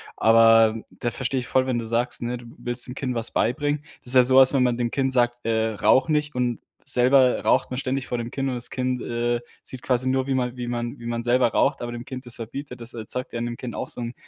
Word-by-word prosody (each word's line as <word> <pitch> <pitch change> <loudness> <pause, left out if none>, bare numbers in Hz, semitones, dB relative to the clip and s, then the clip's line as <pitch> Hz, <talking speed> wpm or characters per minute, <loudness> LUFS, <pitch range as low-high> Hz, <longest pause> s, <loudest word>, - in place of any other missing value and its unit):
Aber 115 0 +5
da 120 - -4
verstehe 130 +2 -2
ich 125 - -9
voll, 130 0 +1
wenn 125 -2 -1
du 115 - -5
sagst, 120 +2 -1
ne, 120 +1 -3
du 120 - -13
willst 120 0 +2
dem 125 - -8
Kind 130 -2 -3
was 115 -1 0
beibringen. 145 +4 -1 0.2
Das - - -17
ist 125 - +8
ja 125 - +7
sowas, 130 +1 +6
wenn 135 -2 +3
man 125 -1 +1
dem 120 -1 -2
Kind 135 -1 0
sagt, 120 -1 +1
äh: 110 -1 0
„Rauche 130 +7 +2
nicht." 150 -1 -1
und 125 -2 -1 0.3
selber 125 +1 +4
raucht 130 - +2
man 125 - -5
ständig 135 0 -3
vor 120 - -3
dem 120 0 -5
Kind 135 0 -2
und 130 - -3
das 120 - -2
Kind, 125 -1 -2
äh, 120 0 -2 0.2
sieht 130 - -7
quasi 130 0 +1
nur, 130 0 0
wie 135 - -1
man 125 -1 -2
wie 120 -1 -5
man 120 0 -4
wie 120 - -11
man 120 0 -3
selber 120 +1 +2
raucht, 135 +3 0
aber 120 - -5
dem 120 0 -7
Kind 130 +1 -8
das 120 - -6
verbietet. 125 +2 -8
Das 115 +1 -5
erzeugt 120 +3 -3
ja - - -3
in 120 - -2
dem 120 0 -5
Kind 125 -2 -7
auch - - -5
so - - -3
'n 120 0 -5
125 Hz, 270 wpm, -23 LUFS, 120-130 Hz, 0.3 s, ist